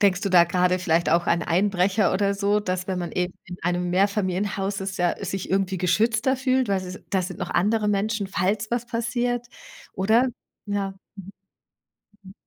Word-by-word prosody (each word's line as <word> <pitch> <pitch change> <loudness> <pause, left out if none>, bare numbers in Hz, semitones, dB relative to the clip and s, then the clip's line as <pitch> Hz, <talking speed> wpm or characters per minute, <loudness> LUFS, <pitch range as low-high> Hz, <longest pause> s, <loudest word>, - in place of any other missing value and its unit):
denkst 195 -2 +3
du 200 - -1
da 175 -2 +7
grade 180 +1 +1
vielleicht 170 -2 +1
auch 170 +1 +2
an 170 0 +2
Einbrecher 190 +2 +2
oder 200 +1 +1
so, 200 +1 +1
dass 185 -3 -3
wenn 185 -1 -1
man 175 -1 -4
eben 180 0 -2
in 180 - -8
einem 175 +1 0
Mehrfamilienhaus 195 +1 0
ist, 190 0 -4
ja 175 +3 0
sich 190 -1 -4
irgendwie 190 0 +1
geschützter 225 +8 +2
fühlt, 260 -1 +1
weil 195 -1 +1
sie 185 0 -7
da 190 - +2
sind 185 0 -5
noch - - -4
andere 210 +3 +1
Menschen, 210 0 0
falls 205 +3 -1
was 240 0 -1
passiert 240 +1 -1 0.5
oder? 220 +7 +3 0.4
Ja. 200 -1 -2 1.3
Mhm. 190 -1 -13
Mhm. - - -28
195 Hz, 180 wpm, -24 LUFS, 180-210 Hz, 1.3 s, da